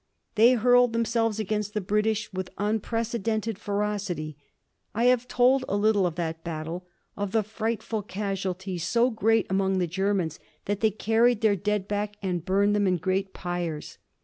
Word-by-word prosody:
They 230 Hz, +3 st, +6 dB
hurled 245 Hz, 0 st, +4 dB
themselves 230 Hz, -1 st, +1 dB
against 210 Hz, 0 st, -2 dB
the -, -, +2 dB
British 210 Hz, +2 st, 0 dB
with 185 Hz, -1 st, -4 dB
unprecedented 220 Hz, 0 st, -1 dB
ferocity. 205 Hz, -7 st, -2 dB, 0.6 s
I 230 Hz, -, +1 dB
have 250 Hz, 0 st, +3 dB
told 255 Hz, +2 st, +3 dB
a 200 Hz, -, +1 dB
little 205 Hz, -2 st, +3 dB
of 170 Hz, -, -5 dB
that 165 Hz, -1 st, -3 dB
battle, 165 Hz, +2 st, -5 dB, 0.3 s
of 205 Hz, -1 st, -3 dB
the 220 Hz, -1 st, +3 dB
frightful 220 Hz, +1 st, -3 dB
casualties, 190 Hz, -3 st, -3 dB
so 235 Hz, +7 st, +2 dB
great 225 Hz, 0 st, +2 dB
among 190 Hz, 0 st, +1 dB
the 180 Hz, -, +1 dB
Germans 185 Hz, -2 st, -1 dB, 0.3 s
that 205 Hz, 0 st, -1 dB
they 220 Hz, -, +3 dB
carried 225 Hz, +2 st, +2 dB
their 215 Hz, -2 st, +4 dB
dead 205 Hz, +1 st, -1 dB
back 205 Hz, 0 st, -2 dB
and 180 Hz, -3 st, -1 dB
burned 200 Hz, +3 st, +2 dB
them 205 Hz, -1 st, +2 dB
in 180 Hz, -1 st, +2 dB
great 190 Hz, +2 st, -1 dB
pyres. 175 Hz, -4 st, -4 dB
205 Hz, 160 wpm, -26 LUFS, 185-220 Hz, 0.6 s, They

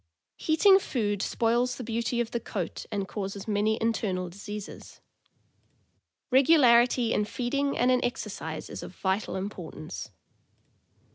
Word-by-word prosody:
Heat 315 Hz, +4 st, 0 dB
ing 390 Hz, -1 st, +9 dB
food 205 Hz, -, -1 dB
spoils 240 Hz, +3 st, +1 dB
the 250 Hz, -, -6 dB
beauty 230 Hz, +1 st, -1 dB
of 235 Hz, -1 st, -1 dB
the 235 Hz, -, -1 dB
coat, 185 Hz, -6 st, -5 dB
and 200 Hz, -2 st, -2 dB
causes 195 Hz, -1 st, -5 dB
many 215 Hz, +1 st, +1 dB
internal 200 Hz, -5 st, -1 dB
diseases. 205 Hz, +3 st, -8 dB, 1.3 s
Regularity 250 Hz, -4 st, +5 dB
in 210 Hz, -, +2 dB
feeding 275 Hz, +5 st, -1 dB
and 250 Hz, +1 st, +3 dB
in 250 Hz, -, +2 dB
exercise 245 Hz, -, -4 dB
is -, -, -6 dB
of -, -, -9 dB
vital 190 Hz, +2 st, -1 dB
importance. 185 Hz, -4 st, -6 dB
225 Hz, 130 wpm, -28 LUFS, 200-245 Hz, 1.3 s, ing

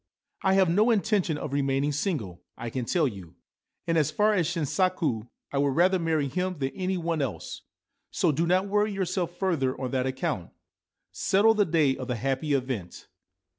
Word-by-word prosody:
* -, -, -59 dB
I 190 Hz, -, +3 dB
have 190 Hz, -1 st, +5 dB
no 205 Hz, +8 st, +3 dB
intention 205 Hz, -7 st, +1 dB
of 145 Hz, -, -5 dB
remaining 140 Hz, +1 st, +1 dB
single, 140 Hz, -, -3 dB, 0.2 s
I 115 Hz, 0 st, -5 dB
can 125 Hz, -1 st, -3 dB
tell 160 Hz, +3 st, +2 dB
you; 95 Hz, -7 st, -9 dB, 0.5 s
and 165 Hz, -1 st, +2 dB
as 150 Hz, -, +2 dB
for 210 Hz, +7 st, +2 dB
Shinsaku 170 Hz, -, 0 dB, 0.3 s
I 140 Hz, -, +1 dB
would 140 Hz, -1 st, +1 dB
rather 185 Hz, +2 st, +4 dB
marry 160 Hz, -4 st, 0 dB
him 180 Hz, +5 st, -2 dB
than 135 Hz, -1 st, -2 dB
any 185 Hz, 0 st, -2 dB
one 165 Hz, -2 st, -1 dB
else 130 Hz, -7 st, -4 dB, 0.2 s
— -, -, -53 dB
so -, -, +1 dB
do 165 Hz, +4 st, 0 dB
not 185 Hz, +3 st, +2 dB
worry 210 Hz, +1 st, +1 dB
yourself 180 Hz, -2 st, -2 dB
further 155 Hz, -9 st, 0 dB
on 130 Hz, -2 st, -3 dB
that 130 Hz, -1 st, 0 dB
account. 130 Hz, -9 st, -2 dB, 0.6 s
Settle 200 Hz, -, +3 dB
the 210 Hz, -2 st, +3 dB
day 155 Hz, -5 st, +2 dB
of 130 Hz, -, -6 dB
the 125 Hz, -, -1 dB
happy 135 Hz, +5 st, -1 dB
event. 125 Hz, -10 st, -3 dB
155 Hz, 185 wpm, -27 LUFS, 135-185 Hz, 0.6 s, have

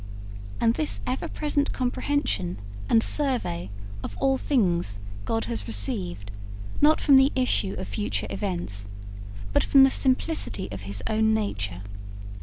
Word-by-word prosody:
And 230 Hz, -, +3 dB
this 305 Hz, +4 st, -1 dB
ever 255 Hz, +1 st, -2 dB
present 295 Hz, -1 st, -1 dB
comprehension 245 Hz, -, -1 dB, 0.3 s
and 225 Hz, -, +5 dB
survey 245 Hz, -, +1 dB, 0.3 s
of -, -, -7 dB
all 270 Hz, 0 st, +3 dB
things 175 Hz, -, +1 dB, 0.3 s
God 110 Hz, 0 st, 0 dB
has 110 Hz, -3 st, -4 dB
received, 100 Hz, -2 st, -2 dB, 0.5 s
not 305 Hz, +2 st, +5 dB
from 280 Hz, -3 st, +6 dB
the 265 Hz, +2 st, +5 dB
issue 105 Hz, -, +2 dB
of 95 Hz, -1 st, -4 dB
future 100 Hz, 0 st, -2 dB
events, 100 Hz, +1 st, -2 dB, 0.7 s
but -, -, +3 dB
from 275 Hz, -1 st, +6 dB
the 270 Hz, -, +5 dB
simplicity 260 Hz, -, 0 dB
of 100 Hz, 0 st, -7 dB
His 100 Hz, 0 st, -5 dB
own 220 Hz, 0 st, +2 dB
nature. 100 Hz, -, -3 dB
115 Hz, 135 wpm, -26 LUFS, -, 0.7 s, from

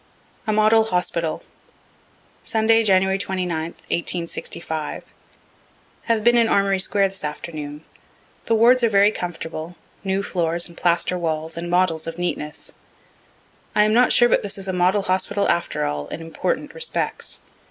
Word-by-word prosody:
A -, -, +2 dB
MODEL 215 Hz, +1 st, +4 dB
HOSPITAL 175 Hz, -5 st, -1 dB, 1.0 s
Sunday, 225 Hz, 0 st, +2 dB
January 190 Hz, -1 st, +3 dB
29th, 180 Hz, -4 st, -3 dB
1865. 170 Hz, -2 st, -3 dB, 1.0 s
Have 225 Hz, -2 st, +1 dB
been 240 Hz, +1 st, +5 dB
in 230 Hz, -1 st, +4 dB
Armory 195 Hz, -1 st, +2 dB
square 195 Hz, +1 st, +3 dB
this 190 Hz, -2 st, -5 dB
afternoon. 150 Hz, 0 st, -6 dB, 0.6 s
The 230 Hz, -, +3 dB
wards 240 Hz, +3 st, +5 dB
are 230 Hz, -, +4 dB
very 200 Hz, 0 st, +5 dB
comfortable, 170 Hz, -3 st, -6 dB, 0.3 s
new 195 Hz, 0 st, -1 dB
floors 170 Hz, -3 st, -1 dB
and 170 Hz, -, -15 dB
plaster 175 Hz, +1 st, +1 dB
walls, 160 Hz, -1 st, -2 dB
and 170 Hz, +1 st, -5 dB
models 175 Hz, -3 st, +1 dB
of 165 Hz, 0 st, -5 dB
neatness. 155 Hz, -4 st, -3 dB, 1.0 s
I 210 Hz, -, +5 dB
am 215 Hz, 0 st, +2 dB
not 245 Hz, +2 st, +4 dB
sure 240 Hz, -, +6 dB
but -, -, +2 dB
this 200 Hz, -1 st, -4 dB
is 195 Hz, -1 st, -4 dB
a 190 Hz, -, -2 dB
model 180 Hz, +3 st, +2 dB
hospital 190 Hz, +2 st, 0 dB
after 170 Hz, -, 0 dB
all, 75 Hz, 0 st, -3 dB
in -, -, -6 dB
important 180 Hz, -, -3 dB
respects. 485 Hz, 0 st, -1 dB
185 Hz, 145 wpm, -22 LUFS, 165-210 Hz, 1.0 s, sure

